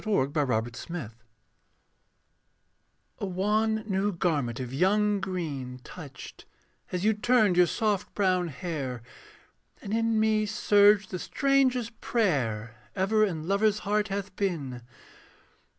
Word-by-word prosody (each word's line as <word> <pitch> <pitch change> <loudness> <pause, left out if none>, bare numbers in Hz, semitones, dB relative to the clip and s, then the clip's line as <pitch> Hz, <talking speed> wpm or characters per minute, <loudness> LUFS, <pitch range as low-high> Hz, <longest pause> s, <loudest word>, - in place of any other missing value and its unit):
THE 220 - -5
LAST 130 - 0
MASQUERADE 160 -10 -5 2.1
A - - -2
wan 215 +4 0
new 195 0 0
garment 150 - -1
of 125 -1 -5
young 205 +6 +2
green 145 -9 -4
Touched, 150 -7 -11 0.5
as 180 +2 -2
you 220 - +4
turned 215 -3 +3
your 180 0 +5
soft 210 -1 -1
brown 185 -3 +2
hair 135 -6 -5 0.8
And 200 - -6
in 225 -1 +1
me 215 -1 +2
surged 205 -2 +4
the 185 - -3
strangest 255 - +1
prayer 120 - 0 0.2
Ever 210 +3 +2
in 165 -6 -2
lover's 205 +2 +2
heart 210 +1 +1
hath 200 -1 -4
been. 145 -11 -2
190 Hz, 120 wpm, -28 LUFS, 150-215 Hz, 2.1 s, your